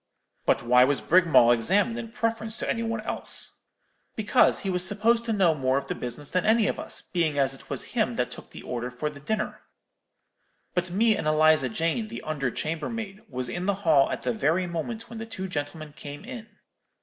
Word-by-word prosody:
"'But - - +3
why 125 +1 +6
was 140 +2 +2
Brigmawl 165 -9 +5
examined 200 - +2
in 230 -1 -7
preference 225 -1 -2
to - - -3
any 230 - 0
one 230 -1 -2
else?' - - -3 0.6
"'Because 215 -1 +3
he 195 - -2
was 180 -1 +3
supposed 225 +4 +2
to 230 - -1
know 190 -6 +4
more 130 -2 +1
of 140 - -2
the - - 0
business 125 +4 -6
than 180 -1 +1
any 220 0 +4
of - - -1
us, - - -4
being 160 -5 -1
as 135 -1 +3
it 135 - -14
was - - -3
him - - +1
that - - -1
took - - -10
the - - -11
order 120 0 -4
for 125 +5 -3
the 145 - -12
dinner. 215 +10 -3 1.1
But 180 0 -1
me 215 +5 +3
and 155 - -3
Eliza 155 -3 +4
Jane, 165 - -1
the 230 - -7
under 145 -4 -1
chambermaid, 195 - -4
was 125 -1 -3
in 175 +9 -4
the 200 - +2
hall 145 -4 +5
at - - -4
the 125 - 0
very 160 +10 +1
moment 180 +7 -4
when 230 -1 -8
the 225 - -6
two 190 -4 -5
gentlemen 155 -2 -5
came 145 +4 -9
in.' 240 -3 -8
170 Hz, 210 wpm, -26 LUFS, 145-220 Hz, 1.1 s, why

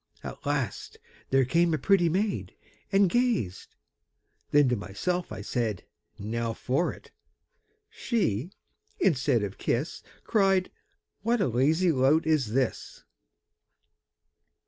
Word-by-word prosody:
At - - -8
last 140 -6 -2 0.3
there 135 -1 +3
came 165 +5 +2
a - - -1
pretty 185 -1 +3
maid, 195 +4 -1 0.4
And 195 0 +5
gazed; 225 - -1 0.7
then 145 -1 +5
to 125 - +2
myself 175 - -3
I 105 -2 -6
said, 110 -2 -2 0.3
'Now 115 +2 -3
for 135 +10 0
it!' - - -14 0.8
She, 170 - -1 0.5
instead 125 - +2
of 100 -1 -5
kiss, 135 +8 -2 0.2
Cried, 195 -4 +2 0.5
'What 235 +3 +1
a - - +2
lazy 155 +9 +2
lout 145 +3 +3
is 145 -9 +1
this!' 130 -2 -2
145 Hz, 115 wpm, -27 LUFS, 120-185 Hz, 0.8 s, And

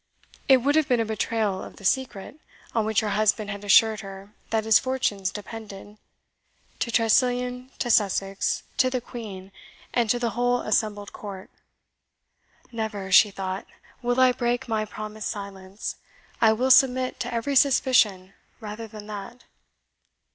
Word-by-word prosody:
It 260 -3 +5
would 285 +2 +3
have 310 -3 +2
been 245 -3 +2
a 225 - +1
betrayal 220 -2 -1
of - - -10
the 200 - -13
secret, 260 +3 -1 0.3
on 225 -2 +1
which 220 -1 +1
her 215 - -2
husband 215 0 +1
had 200 0 -7
assured 215 +2 +5
her 195 0 -10 0.2
that 220 -1 0
his 220 -1 +6
fortunes 255 -8 -1
depended, 210 0 -9 0.8
to - - -1
Tressilian, 250 +2 +1
to 240 - -1
Sussex, 195 -2 +1
to 260 -2 +4
the 255 0 -1
Queen, 210 -6 -9 0.4
and 235 -3 +1
to 245 - +3
the 240 -1 -1
whole 245 +2 +1
assembled 210 -2 -1
court. 195 -2 -9 1.2
"Never," 215 -4 -4
she 210 - +7
thought, 190 -1 -5 0.3
"will 245 +1 0
I 255 -1 +6
break 245 +1 -1
my 220 -2 -1
promised 215 0 -6
silence. 200 -1 -7 0.4
I 225 -1 +6
will 255 +4 +1
submit 255 -1 +4
to 245 - -3
every 235 +4 -2
suspicion 225 -8 +3 0.3
rather 220 +1 -7
than 215 -1 -10
that." 210 +4 -8
220 Hz, 150 wpm, -25 LUFS, 205-245 Hz, 1.2 s, she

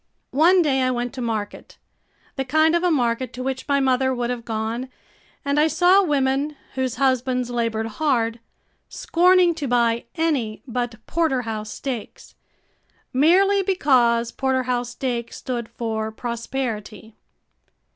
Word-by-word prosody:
One 345 +6 +5
day 270 -4 +1
I 255 - +2
went 245 -1 -2
to 260 - -6
market 220 -3 -4 0.6
the 270 - -1
kind 315 +5 +3
of 340 - +2
a 360 - +3
market 250 -4 0
to 255 - -5
which 265 0 -4
my 280 -1 +2
mother 260 -1 +2
would 245 0 -2
have 240 -2 -4
gone 225 +3 -3 0.6
and 280 +1 +1
I 305 - +5
saw 355 +5 +4
women 285 -2 0 0.2
whose 260 -2 -2
husbands 255 -1 0
labored 230 -2 -1
hard, 230 -1 0 0.5
scorning 360 0 +3
to 305 -4 -4
buy 235 -1 +1
any 285 -10 -1
but 245 -2 -3
porterhouse 245 -10 -1
steaks 250 -2 -6 0.8
merely 380 +9 +4
because 250 - +2
porterhouse 255 -2 -1
steak 240 -2 -3
stood 240 -3 -5
for 220 -2 -3
prosperity. 230 -2 -5
255 Hz, 135 wpm, -22 LUFS, 235-290 Hz, 0.8 s, One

